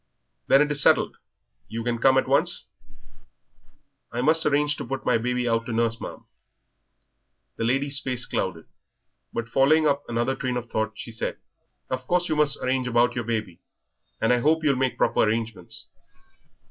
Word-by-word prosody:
"Then 135 +2 +6
it 150 - -3
is 145 0 +1
settled. - - +3 0.5
You 115 +2 -5
can 120 0 -1
come 130 +2 +4
at - - +2
once?" - - +1 1.5
"I 120 - -2
must 160 +4 +3
arrange 145 0 +2
to - - -5
put 135 0 -5
my 115 - +3
baby 125 +1 -1
out 115 0 0
to - - -4
nurse, 115 0 0
ma'am." - - -8 1.3
The 115 - -1
lady's 135 +3 +1
face 125 -3 -2
clouded. 85 -4 -3 0.7
But 115 -1 -4
following 145 +6 +3
up 145 -1 +2
another 120 +3 -1
train 130 -2 -2
of 120 -1 -7
thought, 110 0 -1
she 115 - -8
said 115 - -4 0.5
"Of 130 0 -3
course 175 -1 +1
you 155 - +1
must 150 -2 +2
arrange 130 0 0
about 120 0 +3
your 120 -2 -3
baby, 105 -7 -3 0.6
and 115 +2 +3
I 125 - +2
hope 155 +5 +2
you'll 140 -3 +3
make 130 0 -1
proper - - +1
arrangements. 110 -4 -1
125 Hz, 170 wpm, -25 LUFS, 115-140 Hz, 1.5 s, Then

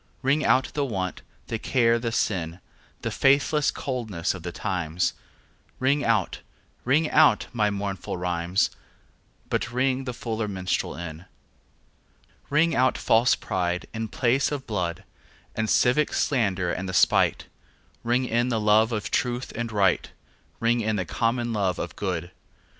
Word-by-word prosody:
Ring 140 +4 +2
out 130 +3 +3
the 145 - 0
want, 95 -8 -3 0.2
the 115 - -4
care 115 -2 +2
the 115 -1 -2
sin, 85 -6 -1 0.4
The - - -2
faithless 140 +2 +3
coldness 110 -10 -2
of 90 - -8
the 90 +1 -5
times; 90 -3 -1 0.6
Ring 140 +3 +1
out, 110 -5 +1 0.4
ring 150 +5 +3
out 155 -1 +5
my 105 -3 +2
mournful 100 -2 -4
rhymes, 90 +1 0 0.8
But 115 - -1
ring 130 +1 0
the 125 - -3
fuller 115 -4 -3
minstrel 95 -2 -2
in. 85 0 -7 1.2
Ring 155 +3 +3
out 130 0 +3
false 115 +2 +3
pride 90 -1 -2
in 110 0 -3
place 130 +6 +1
and 140 -3 -4
blood, 90 -4 -3 0.5
The 110 0 -1
civic 125 +7 +3
slander 95 -9 +1
and 95 +1 -4
the - - -4
spite; - - +3 0.6
Ring 120 +2 +1
in 120 +1 +1
the 115 -3 0
love 110 +2 +4
of 105 -3 -3
truth 125 0 -1
and 115 0 -3
right, 100 -3 +2 0.5
Ring 115 +1 +2
in 110 0 0
the 95 -3 -1
common 120 +5 -1
love 95 -4 0
of - - -5
good. 90 -3 -3
110 Hz, 145 wpm, -25 LUFS, 95-125 Hz, 1.2 s, out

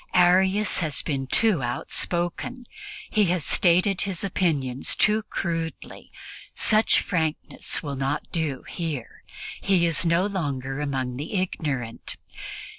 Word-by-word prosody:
Arius 190 +3 +4
has 155 -5 0
been 135 -4 -2
too 205 - +3
outspoken. 175 - -1 0.5
He 215 -1 +3
has 175 -3 0
stated 180 +2 +3
his 195 -3 -2
opinions 145 -9 0
too 215 +1 +3
crudely; 165 -2 -4 0.4
such 215 0 +3
frankness 160 -4 -2
will 140 -2 -4
not 135 +2 -1
do 155 -6 -2
here; 155 -9 -5 0.4
he 185 -3 +3
is 165 0 +4
no 170 +2 +2
longer 140 -9 -3
among 130 -4 -2
the 150 +9 -5
ignorant. 145 -10 -3
165 Hz, 115 wpm, -25 LUFS, 140-185 Hz, 0.5 s, Arius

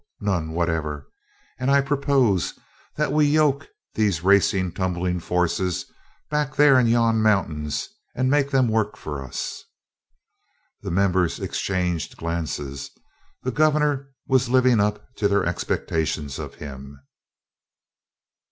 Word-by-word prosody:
None 90 -6 -1
whatever! 80 -4 -2 0.5
And 130 - 0
I 140 0 +5
propose 135 - +1 0.4
that 150 - 0
we 150 0 +4
yoke 145 -2 +2 0.3
these 100 -7 0
racing 95 -1 +3
tumbling 90 -1 -1
forces 90 +1 -1 0.5
back 150 -1 -1
there 145 -3 +6
in 120 - +3
yon 115 -1 +3
mountains 85 -9 0 0.3
and 130 +1 +1
make 140 +1 +2
them 135 -3 +3
work 110 -2 0
for 75 -3 -6
us!" 65 - -5 1.2
The - - -5
members 90 -1 +1
exchanged 90 -4 -2
glances 80 -5 -4 0.5
the 130 - -1
Gov'nor 150 -1 +1 0.2
was 130 -2 +2
living 125 -2 +4
up 105 +1 0
to 105 - +2
their 100 0 +1
expectations 80 -4 -2
of - - -7
him. 70 -1 -9
100 Hz, 120 wpm, -23 LUFS, 85-130 Hz, 1.2 s, there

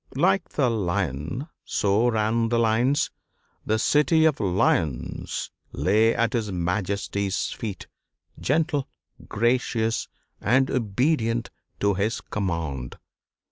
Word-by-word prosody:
Like 190 +7 +2
the 140 -4 +1
lion 95 - -2 0.2
so 105 +4 +2
ran 115 +1 +1
the 120 - +2
lines 120 +5 +2 0.6
the 110 - +2
city 150 +6 +3
of 155 -3 +3
Lyons 90 - 0 0.2
lay 105 +10 +3
at 115 -1 +1
his 110 -4 -1
Majesty's 100 +2 -1
feet, 105 -4 -5 0.5
gentle, 150 -1 +1 0.4
gracious, 115 -1 +1 0.3
and 130 +5 +3
obedient 115 0 0 0.3
to 100 0 +3
his 105 +4 -1
command. 80 -10 -3
110 Hz, 100 wpm, -25 LUFS, 100-125 Hz, 0.6 s, city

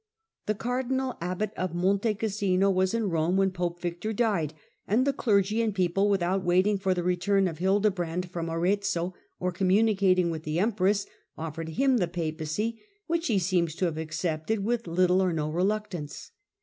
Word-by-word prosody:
The 215 - +1
cardinal 255 +3 -1
abbot 185 +4 -2
of 185 -2 -3
Monte 200 +5 +1
Oassino 200 -2 +1
was 185 +3 +1
in 220 -5 0
Rome 165 +3 +1
when 195 0 +3
pope 175 -1 -3
Victor 175 +5 -3
died; 200 -9 0 0.3
and 235 +6 +2
the 280 - +2
clergy 210 -3 +2
and 220 -3 -1
people, 190 +2 +2
with 195 -3 +2
out 185 +2 0
waiting 185 +3 +3
for 190 -1 +1
the 175 - -2
return 180 +2 +2
of 165 -3 -5
Hildebrand 180 -3 0
from 170 -2 -3
Arezzo, 180 +1 0 0.3
or 180 0 -1
communicating 190 -1 +3
with 160 -1 -4
the 155 0 -3
empress, 200 0 +2 0.3
ofiered 160 0 -5
him 270 +2 +3
the 180 -6 +1
Papacy, 165 +6 -3 0.2
which 335 0 -1
he 220 - +2
seems 175 -3 +1
to 185 - 0
have 160 -2 -2
accepted 160 +5 -2
with 235 -2 -1
little 180 +2 +3
or 185 -1 +2
no 155 -2 -2
reluctance. 185 -3 -2
185 Hz, 175 wpm, -27 LUFS, 175-210 Hz, 0.3 s, when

